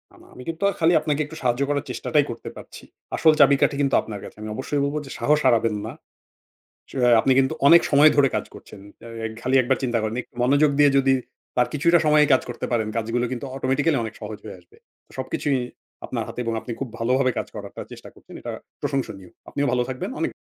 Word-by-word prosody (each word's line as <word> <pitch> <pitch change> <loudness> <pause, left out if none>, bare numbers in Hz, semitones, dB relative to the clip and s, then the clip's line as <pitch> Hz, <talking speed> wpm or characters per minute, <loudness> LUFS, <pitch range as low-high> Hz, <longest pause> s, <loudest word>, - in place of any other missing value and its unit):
আমা - - -19
আমি 125 - -11
কিন্তু 165 +4 -5 0.2
খালি 165 +1 +4
আপনাকে 150 -1 -1
একটু 150 - -11
সাহায্য 125 +1 0
করার 145 0 -1
চেষ্টাটাই 150 -2 +1
করতে 115 - -8
পারছি। - - -12 0.3
আসল 160 -1 +5
চাবিকাঠি 140 0 +5
কিন্তু 140 -1 +2
আপনার 105 -2 -7
কাছে। - - -11
আমি 110 - -6
অবশ্যই 140 +3 -2
বলবো 145 +2 -2
যে - - -11
সাহস 150 +1 +3
হারাবেন 115 -2 +3
না। - - -5 1.0
চ্যা - - -8
হ্যাঁ 120 -1 +6
আপনি 135 - +2
কিন্তু 135 +3 +1
অনেক 170 +3 +8
সময় 145 +2 +7
ধরে 145 -2 +5
কাজ - - -1
করছেন। 105 - -13 0.2
অ্যা 115 -1 -6
খালি 130 +2 0
১ - - -5
বার 130 - +3
চিন্তা 120 -2 0
করেন 110 +1 -2
একটু - - -35
মনোযোগ 145 +3 +4
দিয়ে 145 -1 +7
যদি 135 0 +4 0.4
তার 125 - +3
কিছুটা 170 +4 +4
সময়েই 150 -1 +5
কাজ 130 - +4
করতে 120 - -4
পারেন, 110 -3 0
কাজগুলো 115 +2 -1
কিন্তু 125 +2 -5
অটোমেটিক্যালি 135 +3 +1
অনেক 110 -1 -5
সহজ 105 0 -6
হয়ে 100 -3 -8
আসবে। 85 - -24 0.4
সবকিছুই 130 +1 -1 0.5
আপনার - - -3
হাতে, - - -8
এবং 115 - -1
আপনি 125 - -7
খুব 135 - -4
ভালোভাবে 130 +3 +2
কাজ - - -2
করারটা - - -8
চেষ্টা - - -11
করছেন। - - -17
এটা - - -5 0.3
প্রশংসনীয়। 95 -9 -4 0.2
আপনিও 145 0 -1
ভালো 125 0 +1
থাকবেন 130 -1 -4
অনেক - - -1
135 Hz, 210 wpm, -23 LUFS, 120-145 Hz, 1.0 s, অনেক